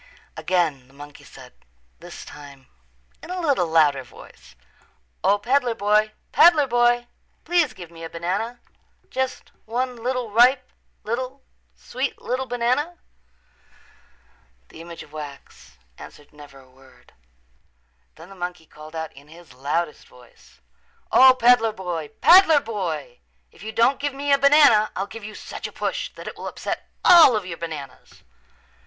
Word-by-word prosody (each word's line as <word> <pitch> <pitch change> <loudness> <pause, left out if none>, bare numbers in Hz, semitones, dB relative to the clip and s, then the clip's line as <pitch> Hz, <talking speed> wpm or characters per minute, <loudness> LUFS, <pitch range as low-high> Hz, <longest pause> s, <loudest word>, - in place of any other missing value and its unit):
Again 160 -8 -1
the 135 - -23
monkey 145 +1 -13
said, - - -15 0.5
this - - -11
time 140 -2 -13 0.6
in - - -12
a 365 0 -4
little 280 - +1
louder 155 -4 +3
voice, 60 - -17 0.7
"O, 205 - +3
peddler 245 +2 0
boy, 210 +1 +2 0.2
peddler 325 -4 +6
boy, 240 -1 +2 0.4
please 340 -6 +1
give 175 -3 -11
me 165 -1 -12
a 165 - -6
banana, 195 +9 -4 0.5
just 260 0 -4
one 250 +3 -3
little, 245 -1 -3
ripe 250 +3 +4 0.3
little, 255 +4 -5 0.3
sweet 260 +2 -5
little 255 +1 -3
banana." 250 +8 -1 1.7
The 160 - -12
image 170 0 -10
of 150 - -20
wax 140 - -11 0.2
answered 145 0 -14
never 145 -2 -14
a 130 - -19
word. 130 +1 -22 1.0
Then 180 - -14
the - - -12
monkey 175 -3 -6
called 155 +1 -14
out 160 -1 -5
in 140 +1 -17
his 165 -1 -16
loudest 150 +5 -3
voice, 125 -1 -21 0.5
"O, 260 0 +7
peddler 240 -3 +4
boy, 175 -6 -5
peddler 345 -4 +7
boy, 170 - -5 0.3
if - - -20
you 220 +2 -6
don't 235 +5 +2
give 285 -1 -3
me 285 +1 0
a 280 - +4
banana 280 -7 +5
I'll 195 - -2
give 225 +2 -11
you 210 0 -9
such - - -7
a - - -12
push - - -4
that - - -11
it - - -7
will - - -7
upset - - -6 0.2
all 330 -9 +8
of 210 -3 -2
your 170 -2 -7
bananas." 155 -5 -9
210 Hz, 150 wpm, -23 LUFS, 155-255 Hz, 1.7 s, all